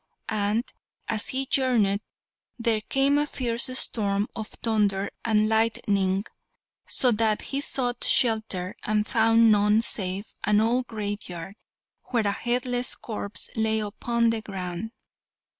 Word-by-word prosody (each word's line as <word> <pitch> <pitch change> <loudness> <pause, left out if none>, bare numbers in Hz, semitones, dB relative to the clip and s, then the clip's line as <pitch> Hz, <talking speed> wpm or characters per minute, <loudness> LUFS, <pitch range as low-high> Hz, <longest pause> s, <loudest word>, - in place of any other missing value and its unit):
And 210 +2 0 0.4
as 220 -3 -1
he 270 0 -1
journeyed 230 -7 +2 0.6
there 230 -2 0
came 270 +6 +2
a 295 - 0
fierce 240 -3 +1
storm 205 -3 +1
of 220 -1 -5
thunder 205 -4 0
and 215 -2 +2
lightning, 205 -3 +1 0.6
so 250 - +3
that 220 -1 +1
he 275 - 0
sought 245 -4 -1
shelter, 215 -6 +1
and 210 0 0
found 225 0 +4
none 210 +1 +4
save 195 -1 -1
an 210 0 +3
old 240 +3 +1
graveyard, 205 -5 -5 0.5
where 235 -4 0
a 200 - +2
headless 245 +3 0
corpse 210 -2 -3
lay 220 0 +1
upon 230 +2 0
the 225 -1 -2
ground. 185 0 -5
220 Hz, 125 wpm, -26 LUFS, 205-235 Hz, 0.6 s, found